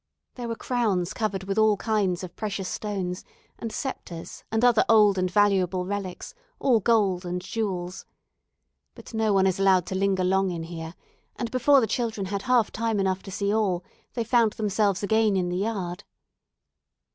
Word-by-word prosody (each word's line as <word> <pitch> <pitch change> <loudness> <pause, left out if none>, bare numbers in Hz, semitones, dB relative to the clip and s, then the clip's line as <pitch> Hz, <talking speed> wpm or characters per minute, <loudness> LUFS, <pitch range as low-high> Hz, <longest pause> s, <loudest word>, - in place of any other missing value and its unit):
There 245 -2 -6
were 230 - -3
crowns 215 -9 -1
covered 200 -4 -2
with 195 +2 -1
all 215 -1 +4
kinds 195 -5 0
of 180 - -8
precious 200 -3 -3
stones, 190 -4 -3 0.4
and 230 - -4
sceptres, 175 -12 -6
and 225 +2 +2
other 240 -3 +5
old 210 -4 +5
and 185 0 +1
valuable 190 -2 +2
relics, 195 -2 -5 0.2
all 250 -5 +3
gold 200 -4 +2
and 180 0 -3
jewels. 185 -2 -4 0.9
But - - -13
no 220 -1 +1
one 195 -1 +4
is 190 0 +1
allowed 190 -2 +4
to - - -5
linger 190 -1 +1
long 190 +1 +2
in 170 -2 -4
here, 165 0 -7 0.4
and 235 -2 -4
before 270 +3 +5
the - - +2
children 220 -2 -2
had 200 +1 -3
half 250 -2 +2
time 225 -1 -1
enough 190 -1 0
to - - -10
see 200 +1 -1
all, 195 -5 +1 0.3
they 235 - 0
found 230 -1 +3
themselves 205 -2 0
again 220 -1 +2
in 180 -1 0
the 175 - -2
yard. 190 -4 -3
200 Hz, 175 wpm, -26 LUFS, 185-220 Hz, 0.9 s, other